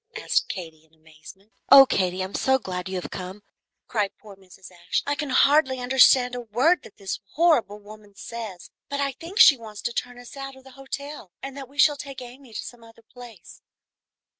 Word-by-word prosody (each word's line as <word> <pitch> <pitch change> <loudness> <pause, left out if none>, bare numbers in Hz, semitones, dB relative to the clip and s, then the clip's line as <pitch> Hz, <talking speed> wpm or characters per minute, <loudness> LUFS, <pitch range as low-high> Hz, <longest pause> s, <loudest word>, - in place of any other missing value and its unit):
asked - - 0
Katy, 160 -4 -7
in 160 0 -29
amazement. 160 +6 -16 0.2
"Oh, 275 0 +11
Katy, 185 -5 -1
I - - -2
am 190 - -10
so 265 0 +2
glad 185 -5 -6
you 190 -1 -3
have - - -8
come," 190 +2 -7 0.4
cried 210 -4 0
poor 210 -3 -14
Mrs. 190 -1 -16
Ashe. 175 -1 -3
"I 285 - 0
can 290 -1 -4
hardly 275 0 +4
understand 250 0 +4
a 245 - -4
word 250 +10 +2
that - - -16
this 195 -1 -5
horrible 305 -11 +2
woman 210 -1 -15
says, 205 -7 -8 0.2
but 280 - -3
I 280 -1 0
think 335 - -10
she 280 - +8
wants 215 -3 -10
to 235 - -2
turn 245 0 -4
us 245 +2 -12
out 275 -1 -7
of 265 - -17
the 265 - -15
hotel, 270 -3 -8
and 270 0 -7
that 270 -2 -9
we 280 - -20
shall 295 -1 +5
take 275 -1 -8
Amy 250 0 -12
to - - -6
some 240 -1 -11
other 230 0 -18
place. 235 -6 -14
240 Hz, 210 wpm, -24 LUFS, 195-270 Hz, 0.4 s, Oh